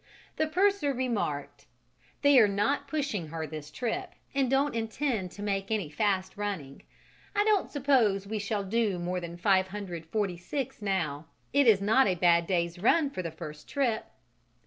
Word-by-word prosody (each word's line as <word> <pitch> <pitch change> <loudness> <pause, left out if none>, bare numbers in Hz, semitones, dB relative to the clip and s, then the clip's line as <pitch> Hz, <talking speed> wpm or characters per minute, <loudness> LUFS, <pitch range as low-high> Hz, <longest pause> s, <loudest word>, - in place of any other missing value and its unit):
The 315 - +1
purser 365 -3 +2
remarked: 230 - -3 0.6
"They 285 -2 +7
are 215 - +7
not 210 +9 0
pushing 280 - -2
her 160 +1 -4
this 155 -1 -7
trip 350 - -3 0.2
and 270 -2 +1
don't 275 +2 +2
intend 225 -2 -1
to 205 - -8
make 195 -1 -1
any 205 -9 -1
fast 190 +2 0
running: 190 -10 -4 0.5
I 410 - +4
don't 420 -2 +2
suppose 250 -9 +2
we 215 +1 -3
shall 205 0 -2
do 210 -1 0
more 180 +1 -2
than 170 -1 -7
546 190 - -1
now; 165 -7 -1 0.3
it 280 -2 +4
is 205 -4 +6
not 220 +6 +4
a 185 - +2
bad 170 -1 +3
day's 170 -2 0
run 285 - +3
for 185 - -4
the 170 - -4
first 155 -1 -9
trip." 250 -6 0
205 Hz, 160 wpm, -29 LUFS, 175-265 Hz, 0.6 s, They